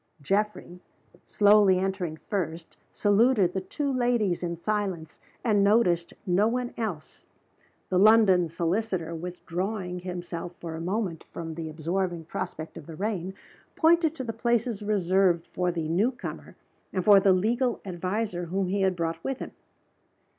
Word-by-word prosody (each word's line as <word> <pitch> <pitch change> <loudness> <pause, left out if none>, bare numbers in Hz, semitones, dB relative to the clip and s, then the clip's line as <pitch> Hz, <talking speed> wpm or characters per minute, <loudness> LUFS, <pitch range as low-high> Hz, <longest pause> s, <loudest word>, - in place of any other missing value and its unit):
Geoffrey, 195 +1 -2 0.5
slowly 205 -2 +5
entering 185 -4 -2
first, 165 -3 -4 0.2
saluted 205 -2 +3
the 190 - -1
two 280 +8 -3
ladies 240 -7 +1
in 170 -1 -3
silence, 190 -4 -3 0.2
and 210 -4 +3
noticed 190 -5 +3
no 195 +3 +3
one 245 +1 -2
else. 200 -10 -5 0.6
The 185 - +2
London 200 -5 +5
solicitor, 170 0 -1
withdrawing 180 +2 -4
himself 175 -1 -6
for 165 -2 -6
a 160 - -5
moment 185 -2 -2
from 165 -1 -6
the 160 0 -5
absorbing 170 +2 -2
prospect 155 0 -6
of 160 - -10
the 165 - -8
rain, 190 -1 -3 0.4
pointed 325 -1 +3
to 260 - -5
the 230 -2 -4
places 235 -1 0
reserved 190 -4 +2
for 180 -1 0
the 165 -2 -3
new 185 +9 +2
comer 245 - -8 0.4
and 185 -2 -2
for 205 -2 +8
the 195 0 +4
legal 235 +6 +1
adviser 185 +1 -2
whom 185 +2 -1
he 200 +1 0
had 190 -1 +2
brought 165 -1 -3
with 270 -1 -2
him. - - -7
190 Hz, 145 wpm, -27 LUFS, 170-215 Hz, 0.6 s, for